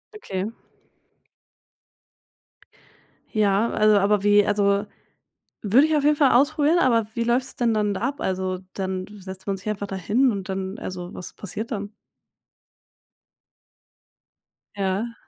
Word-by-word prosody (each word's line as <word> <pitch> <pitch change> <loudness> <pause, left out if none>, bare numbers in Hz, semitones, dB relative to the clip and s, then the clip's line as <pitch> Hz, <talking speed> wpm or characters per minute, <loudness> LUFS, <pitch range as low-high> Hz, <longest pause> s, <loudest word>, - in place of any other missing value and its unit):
Okay. 200 - -4 2.8
Ja, 210 0 +2
also, 215 -1 +4
aber 200 0 +2
wie 205 0 +5
also, 200 0 +2 0.8
würde 245 +9 +4
ich 315 - +1
auf 290 - 0
jeden 300 +1 +4
Fall 280 -3 +4
ausprobieren. 300 +5 +3
Aber 230 -8 +3
wie 235 - -1
läuft's 245 +2 0
denn 240 -4 +1
dann 210 -1 +1
da 190 - -5
ab? 270 +4 -2
Also 185 0 -2
dann 190 -1 -3
setzt 190 -1 -10
man 195 -1 -1
sich 195 - -11
einfach 205 -1 -3
da 195 - -5
hin 230 +8 +2
und 195 -2 -5
dann 190 +1 -4
also, 180 -1 -7
was 180 - -7
passiert 210 +4 -5
dann? 205 -2 -4 2.8
Ja. 200 +4 -2
205 Hz, 135 wpm, -24 LUFS, 195-235 Hz, 2.8 s, wie